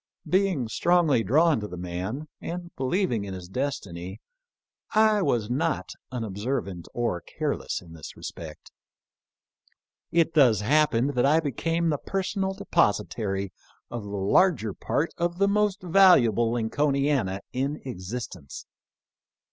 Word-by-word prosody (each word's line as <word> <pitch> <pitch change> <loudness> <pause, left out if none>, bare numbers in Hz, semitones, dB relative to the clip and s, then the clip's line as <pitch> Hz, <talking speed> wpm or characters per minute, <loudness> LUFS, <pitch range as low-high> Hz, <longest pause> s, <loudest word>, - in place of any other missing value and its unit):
Be 195 +2 +3
ing 140 -11 -2
strongly 160 0 +3
drawn 155 - +3
to 105 - -5
the 90 - -8
man, 90 - -4
and 175 0 -6
believing 130 - 0
in 95 -1 -6
his 90 -1 -8
destiny, 95 -6 -4 0.8
I 215 -1 +5
was 120 - +1
not 150 +7 -1 0.2
unobservant 110 -4 -3
or 115 -8 -1
careless - - -3
in 85 -2 -14
this 80 -3 -10
respect. 80 -2 -9 1.4
It 165 -1 +2
thus 125 -9 +5
happened 135 +1 +3
that 125 -1 +2
I 155 +3 +5
became 165 +3 -1
the 145 -3 0
per 195 0 -2
sonal 190 0 -2
depositary 105 - 0 0.4
of 120 - -4
the 100 - -9
larger 105 - +2
part 160 - -1
of 170 0 -1
the 200 +1 +3
most 205 -1 +1
valu 180 -5 +6
able 115 +1 +1
Lincolniana 135 -4 0
in 140 +4 -1
existence. 95 - -7
130 Hz, 130 wpm, -26 LUFS, 105-170 Hz, 1.4 s, valu